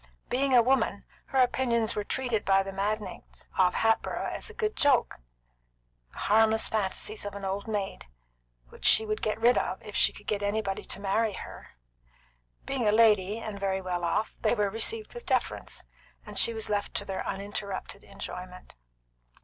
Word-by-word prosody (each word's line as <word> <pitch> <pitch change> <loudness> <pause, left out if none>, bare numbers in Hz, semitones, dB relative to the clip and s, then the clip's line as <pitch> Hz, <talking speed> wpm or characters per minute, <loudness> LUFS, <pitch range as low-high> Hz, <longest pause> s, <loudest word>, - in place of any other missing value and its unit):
Being 265 +1 +2
a 240 - +7
woman, 235 -5 +1 0.2
her 270 - -3
opinions 245 -3 +2
were 210 - -1
treated 240 -1 -1
by 195 0 +4
the 195 0 -6
magnates 210 +2 -4
of 180 -1 +3
Hatboro' 225 0 +1
as - - -5
a - - -10
good 430 -1 -1
joke, 280 -4 +3 1.0
the - - -16
harmless 220 +1 +3
fantasies 215 0 -1
of 205 0 -6
an 200 -1 -5
old 195 +2 -3
maid, 205 - -3 0.6
which - - -15
she 220 - +6
would 215 0 -2
get 215 0 -1
rid 240 +2 +5
of - - -3
if - - -9
she - - +4
could - - -13
get 205 -1 -1
anybody 205 -1 -1
to - - -3
marry 205 +2 +1
her; 60 - -10 0.9
being 255 -5 -1
a - - +5
lady, 210 -2 +4
and 215 -3 -6
very 190 -1 0
well 180 -2 -3
off, 190 +6 -1
they - - +2
were 205 -3 +1
received 430 - -1
with 480 -1 -10
deference, - - -1 0.4
and - - -3
she - - +6
was 220 -1 -3
left 205 -1 -2
to 200 - 0
their 195 -1 -3
uninterrupted 200 0 -5
enjoyment. 180 0 -8
210 Hz, 175 wpm, -28 LUFS, 195-230 Hz, 1.0 s, a